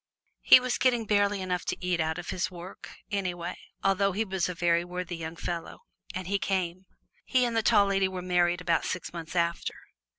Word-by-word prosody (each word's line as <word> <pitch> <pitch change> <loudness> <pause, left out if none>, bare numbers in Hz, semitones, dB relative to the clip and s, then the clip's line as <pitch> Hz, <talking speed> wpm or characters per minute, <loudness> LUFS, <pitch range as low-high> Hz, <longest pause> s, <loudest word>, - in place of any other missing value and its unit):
He - - +9
was 250 -1 -1
getting 240 -3 +2
barely 205 -1 +2
enough 180 -1 -2
to - - -2
eat 180 -1 -1
out 160 0 0
of 175 - -5
his 180 - -1
work, 180 +1 -10 0.2
anyway, 180 -4 -2 0.3
although 195 0 +2
he 220 +4 0
was 190 -3 -1
a 180 - -4
very 170 0 +2
worthy 180 0 -5
young 165 0 -6
fellow. 170 0 -5 0.3
And 185 0 -4
he 200 +2 0
came. 185 -1 -2 0.4
He 255 -2 +2
and 235 -1 -2
the 225 - +3
Tall 210 -2 +5
Lady 195 -1 +2
were 185 -1 -5
married 175 -1 +2
about 170 -2 +1
six 180 - -4
months 165 0 -7
after. 170 -1 0
180 Hz, 200 wpm, -28 LUFS, 175-200 Hz, 0.4 s, He